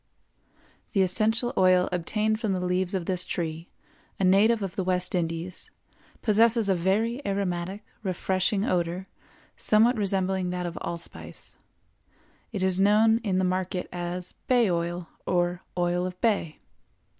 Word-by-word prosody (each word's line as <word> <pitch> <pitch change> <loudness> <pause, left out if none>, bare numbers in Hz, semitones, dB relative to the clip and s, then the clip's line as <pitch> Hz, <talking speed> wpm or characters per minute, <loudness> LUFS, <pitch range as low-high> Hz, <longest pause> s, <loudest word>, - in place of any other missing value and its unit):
The 195 -3 +4
essential 220 +6 +1
oil 185 -1 +4
obtained 215 +5 0
from 215 -4 0
the 185 - -1
leaves 180 +1 0
of 180 -3 -2
this 180 -1 +1
tree, 165 -1 -4 0.5
a - - 0
native 205 +4 +4
of 195 -1 -4
the 195 - -1
West 180 0 0
Indies, 170 0 -3 0.5
possesses 225 0 +4
a - - +5
very 215 +9 0
aromatic, 195 -1 -2 0.2
refreshing 190 +1 0
odor 175 +1 -1 0.5
somewhat 225 +3 +3
resembling 190 -2 0
that 180 0 -3
of 170 -1 -4
allspice. 170 0 -7 1.0
It 200 -4 -2
is 190 -1 +2
known 215 +3 +5
in 200 -6 -1
the 185 - +2
market 185 0 -1
as 175 0 -4 0.2
bay 240 -6 +4
oil 170 0 -2 0.2
or 175 0 +1 0.2
oil 175 +1 +1
of 180 0 -8
bay. 200 -9 0
185 Hz, 140 wpm, -27 LUFS, 180-210 Hz, 1.0 s, a